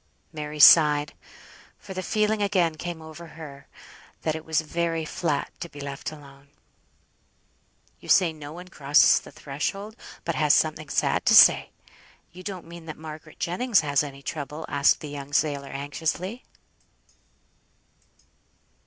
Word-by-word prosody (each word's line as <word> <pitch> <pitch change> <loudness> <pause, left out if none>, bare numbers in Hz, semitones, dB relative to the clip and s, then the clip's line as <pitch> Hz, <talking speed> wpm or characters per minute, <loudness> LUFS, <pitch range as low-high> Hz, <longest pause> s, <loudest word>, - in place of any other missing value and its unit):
Mary 150 -1 -6
sighed, 150 -1 +7 0.6
for 195 - -10
the 185 - -4
feeling 215 +2 0
again 185 -5 +2
came 165 0 -7
over 160 +2 -11
her 145 -4 -11 0.6
that 155 - 0
it 160 0 -6
was 160 -1 0
very 165 0 -2
flat 155 -2 -2
to 170 - -6
be 145 - -12
left 140 0 -6
alone. 140 -2 -14 1.5
"You - - -14
say 175 -4 +4
no 150 -2 -10
one 180 +3 -10
crosses 145 -4 +4
the - - -14
threshold 195 +10 -5 0.3
but - - -1
has - - +3
something - - 0
sad - - 0
to - - +6
say; - - +7 0.6
you 180 - -12
don't 185 -3 -7
mean 170 0 -11
that 155 - -7
Margaret 155 -1 -10
Jennings 200 +3 +1
has 145 -2 +1
any 140 -2 -8
trouble?" 150 +1 -5
asked 140 -1 +2
the 150 - -7
young 145 0 -8
sailor, 145 -2 0
anxiously. 160 - -4
155 Hz, 145 wpm, -25 LUFS, 145-170 Hz, 1.5 s, sighed